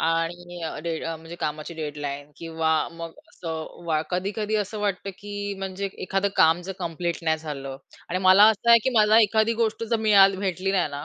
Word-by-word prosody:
आणि 170 +2 -2
अ, 160 - -5
डेड 165 -1 -3
म्हणजे 165 +1 -6
कामाची 155 +1 -4
डेडलाईन 145 -2 -5
किंवा 165 -1 -2 0.2
मग 165 0 -7 0.2
असं 160 0 -7
वा 155 -2 +1
कधी-कधी 205 +4 -2
असं 210 +1 -3
वाटतं, 200 -1 -2
की 205 0 -5
म्हणजे 195 +1 -4 0.2
एखादं 195 +1 0
काम 160 +2 +5
जर 195 - -4
कंप्लीट 170 -1 -3
नाही 160 -1 +1
झालं. 140 -4 -6 0.3
आणि 180 - -1
मला 190 +2 +8
असं 220 +2 0
आहे 235 - +9
की 260 - +2
मला 215 +1 +6
एखादी 220 +1 +2
गोष्ट 225 0 0
जर 230 - +3
मीळा 200 -2 +8
भेटली 190 -1 -2
नाही 185 -5 +1
ना, 145 +1 -6
175 Hz, 185 wpm, -25 LUFS, 160-200 Hz, 0.3 s, आहे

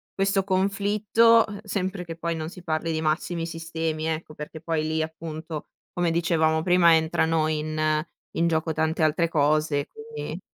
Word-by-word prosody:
questo 195 0 +2
conflitto, 205 +4 +3
uhm, 205 -2 -7
sempre 190 -2 -2
che 165 -2 -7
poi 170 0 -2
non 160 0 -4
si 180 0 -12
parli 165 0 -1
di 160 0 -1
massimi 165 +2 -1
sistemi 165 -1 -3
ecco, 160 -1 -3
perché 150 +1 -8
poi 160 0 -1
lì 160 0 0
appunto, 160 -1 -6 0.3
come 175 -1 +1
dicevamo 160 -1 +2
prima, 175 -2 +6
entrano 160 0 +2
in 155 0 0 0.3
in 170 - +2
gioco 160 -1 0
tante 160 +1 0
altre 160 +2 +2
cose 150 -1 +1
quindi, 455 +1 -7
165 Hz, 160 wpm, -25 LUFS, 155-180 Hz, 0.3 s, prima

